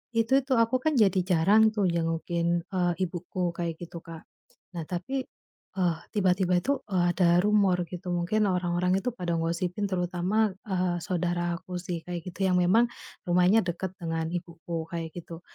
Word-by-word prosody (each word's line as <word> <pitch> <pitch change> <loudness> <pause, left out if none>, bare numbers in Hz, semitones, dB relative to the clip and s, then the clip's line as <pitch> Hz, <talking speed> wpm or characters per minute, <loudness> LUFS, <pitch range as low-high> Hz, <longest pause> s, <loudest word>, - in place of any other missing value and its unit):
itu 230 +4 +3
tuh, 260 -3 +1
aku 230 +3 +2
kan 315 +3 +1
jadi 195 -4 +4
jarang 200 +5 +4
tuh 205 -3 +1
jengukin, 170 +1 0
eee, 180 -2 +1
ibuku 180 0 -3
kayak 170 -2 -3
gitu, 170 0 -7
Kak. 165 -1 -9 0.5
Nah 165 - -2
tapi, 255 - -3 0.5
eee, 175 -3 +1 0.2
tiba-tiba 185 -3 +2
itu, 280 +6 +1
eee, 185 -3 +2
ada 175 -1 +4
rumor 200 -4 +3
gitu. 180 0 -5
Mungkin 200 +5 +1
orang-orang 180 +1 +1
itu 250 - -1
pada 175 -5 -2
ngosipin, 170 +4 -1
terutama, 185 +3 0
eee, 180 -2 0
saudara 175 0 -1
aku 180 -1 -6
sih, 175 -2 -4
kayak 175 0 -5
gitu, 190 +2 -2
yang 180 -1 +3
memang 205 +7 +5 0.4
rumahnya 180 +5 +4
dekat 180 +1 -3
dengan 165 -1 -2
ibuku, 170 -1 -5
kayak 165 -1 -4
gitu. 170 0 -8
180 Hz, 160 wpm, -28 LUFS, 170-195 Hz, 0.5 s, memang